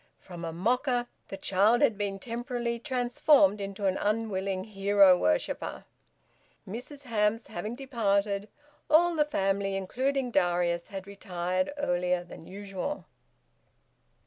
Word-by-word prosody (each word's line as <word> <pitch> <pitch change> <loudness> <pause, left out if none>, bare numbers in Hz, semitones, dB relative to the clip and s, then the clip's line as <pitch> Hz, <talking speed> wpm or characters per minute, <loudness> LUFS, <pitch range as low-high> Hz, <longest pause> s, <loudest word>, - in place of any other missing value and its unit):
From 175 -2 -10
a 165 - -3
mocker, 245 - +1 0.2
the 195 - -6
child 205 +7 +3
had 240 -7 +4
been 200 -1 -2
temporarily 235 +1 -3
transformed 245 -4 +3
into 195 0 -4
an 190 -1 +2
unwilling 200 -3 -1
hero 200 -2 +5
worshipper. 90 - -1 0.8
Mrs 250 +8 -7
Hamps 225 -2 0
having 210 +7 -5
departed, 210 -6 0 0.4
all 345 +3 +5
the 305 - +4
family, 195 -8 0
including 255 +7 -1
Darius, 175 -3 +1
had 195 -2 -7
retired 185 0 -2
earlier 180 -8 0
than 170 -2 -12
usual. 200 +8 -5
200 Hz, 120 wpm, -29 LUFS, 190-240 Hz, 0.8 s, hero